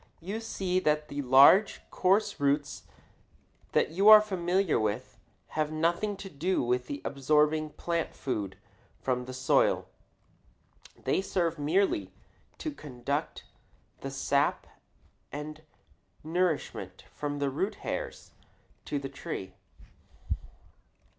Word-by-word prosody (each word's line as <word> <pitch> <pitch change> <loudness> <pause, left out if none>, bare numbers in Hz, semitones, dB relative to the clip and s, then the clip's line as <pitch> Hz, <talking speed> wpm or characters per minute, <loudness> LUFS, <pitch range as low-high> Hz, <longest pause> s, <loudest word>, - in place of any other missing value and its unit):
You 195 +6 -4
see 190 -5 -1
that 150 -3 0
the 145 0 -3
large, 140 +10 +6
coarse 205 +1 +2
roots 145 +1 0 0.9
that - - +2
you 195 +6 +5
are 215 0 +12
familiar 190 -3 +1
with 110 +3 -3 0.3
have 155 -1 -1
nothing 170 +6 0
to 195 - -8
do 180 +1 -1
with 125 +1 0 0.2
absorbing 150 +3 +2
plant 170 -1 -2
food 105 -8 -3 0.4
from 125 -1 -1
the 130 - -7
soil. 130 - +2 1.1
They - - 0
serve 170 -4 -1
merely 175 +7 +1 0.5
to 310 - -4
conduct 145 - -4 0.6
the - - -5
sap - - +1 0.7
and 150 +2 -6 0.6
nourishment 165 0 -2
from 145 -1 -3
the 140 -1 0
root 190 +10 -1
hairs - - -4 0.5
to 145 - -2
the 140 -1 -4
tree. 115 -8 -6
155 Hz, 110 wpm, -29 LUFS, 140-185 Hz, 1.1 s, are